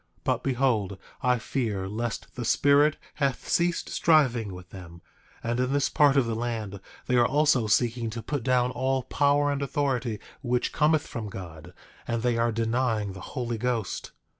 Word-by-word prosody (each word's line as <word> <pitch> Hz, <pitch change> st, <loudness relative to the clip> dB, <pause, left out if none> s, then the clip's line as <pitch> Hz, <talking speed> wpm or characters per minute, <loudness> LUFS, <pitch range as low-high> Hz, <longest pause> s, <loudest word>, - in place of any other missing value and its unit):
But -, -, 0 dB
behold, 120 Hz, -7 st, 0 dB, 0.2 s
I 125 Hz, 0 st, +3 dB
fear 110 Hz, -6 st, -2 dB
lest 115 Hz, +3 st, -4 dB
the 125 Hz, -, -4 dB
Spirit 145 Hz, +5 st, +4 dB, 0.2 s
hath 135 Hz, -3 st, 0 dB
ceased 170 Hz, 0 st, +1 dB
striving 125 Hz, -, +3 dB
with 90 Hz, 0 st, -11 dB
them; 85 Hz, -2 st, -11 dB, 0.4 s
and 120 Hz, +1 st, -1 dB
in 125 Hz, +1 st, +1 dB
this 140 Hz, -1 st, +2 dB
part 145 Hz, -2 st, +4 dB
of 135 Hz, -, +4 dB
the 115 Hz, -, -2 dB
land 110 Hz, -4 st, -3 dB, 0.3 s
they 125 Hz, -, +1 dB
are 120 Hz, -, +5 dB
also 145 Hz, -5 st, +3 dB
seeking 115 Hz, +2 st, +1 dB
to 115 Hz, 0 st, -6 dB
put 145 Hz, -3 st, -2 dB
down 125 Hz, 0 st, +2 dB
all 130 Hz, +1 st, 0 dB
power 145 Hz, +1 st, +2 dB
and 140 Hz, 0 st, -2 dB
authority 130 Hz, -6 st, -1 dB, 0.2 s
which 125 Hz, -2 st, -1 dB
cometh 155 Hz, 0 st, +3 dB
from 110 Hz, -3 st, -6 dB
God; 85 Hz, -5 st, -9 dB, 0.4 s
and 115 Hz, -1 st, -1 dB
they 120 Hz, -1 st, +2 dB
are 115 Hz, 0 st, +1 dB
denying 115 Hz, -2 st, 0 dB
the 95 Hz, -, -9 dB, 0.2 s
Holy 120 Hz, -2 st, -2 dB
Ghost. 120 Hz, -4 st, -2 dB
120 Hz, 170 wpm, -27 LUFS, 110-135 Hz, 0.4 s, are